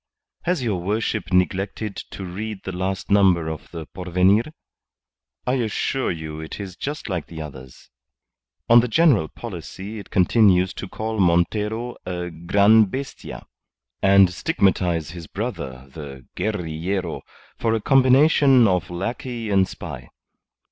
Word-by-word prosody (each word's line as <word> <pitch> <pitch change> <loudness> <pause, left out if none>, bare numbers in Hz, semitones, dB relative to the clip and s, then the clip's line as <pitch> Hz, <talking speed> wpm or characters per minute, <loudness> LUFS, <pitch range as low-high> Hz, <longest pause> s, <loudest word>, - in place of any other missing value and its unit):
"Has 175 -6 0
your 100 -7 -1
worship 105 -1 -2
neglected 95 +3 0
to 95 - -7
read 100 +3 -6
the 95 - -4
last 95 +1 -3
number 95 -5 +4
of 80 -1 -7
the 80 -2 -7
Porvenir? 90 +5 +2 1.0
I 125 - +1
assure 120 +4 -1
you 80 -2 -5
it 80 +5 -7
is 95 -3 -7
just 145 +8 -5
like 90 -6 -3
the 80 - -9
others. 65 -6 -10 0.8
On 120 +1 +8
the 120 - +1
general 125 - +4
policy 100 +1 -8
it 100 - -11
continues 95 -1 +4
to 100 - -6
call 110 +3 -4
Montero 105 +7 +1
a 90 -1 -4
gran' 100 +6 +4
bestia, 135 +8 -7 0.6
and 95 -2 +5
stigmatize 90 - +1
his 85 -2 -9
brother, 70 - -5
the 70 -5 -9
guerrillero, 90 -1 -2 0.4
for 115 -1 +1
a - - 0
combination 135 0 +5
of 90 -3 0
lackey 115 +5 -4
and 95 -1 +4
spy. - - -8
95 Hz, 135 wpm, -22 LUFS, 85-110 Hz, 1.0 s, On